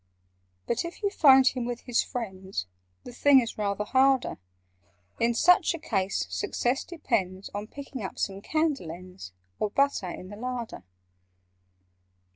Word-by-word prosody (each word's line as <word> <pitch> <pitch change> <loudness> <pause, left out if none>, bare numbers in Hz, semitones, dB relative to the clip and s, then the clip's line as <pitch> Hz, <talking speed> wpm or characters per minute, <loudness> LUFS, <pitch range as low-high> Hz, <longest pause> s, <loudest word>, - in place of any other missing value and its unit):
"But 235 - -1
if 340 +5 -8
you 405 - +1
find 270 -8 +7
him 255 -1 +2
with 240 0 -4
his 245 -1 +1
friends, 190 - -5 0.4
The 245 - -10
thing 275 +2 +6
is 235 -3 -4
rather 205 0 -1
harder. 265 - +2 0.8
In 235 0 +2
such 350 +5 +4
a - - -5
case 200 - -1
success 240 - -1
depends 200 - -2
On 205 +1 -4
picking 275 -1 -8
up 190 - -6
some 195 0 -2
candle 305 - 0
ends, 175 - -9 0.3
Or 210 - 0
butter, 275 -5 +1
in 185 +1 -8
the 205 - -9
larder. 240 - -5
235 Hz, 145 wpm, -27 LUFS, 195-270 Hz, 0.8 s, find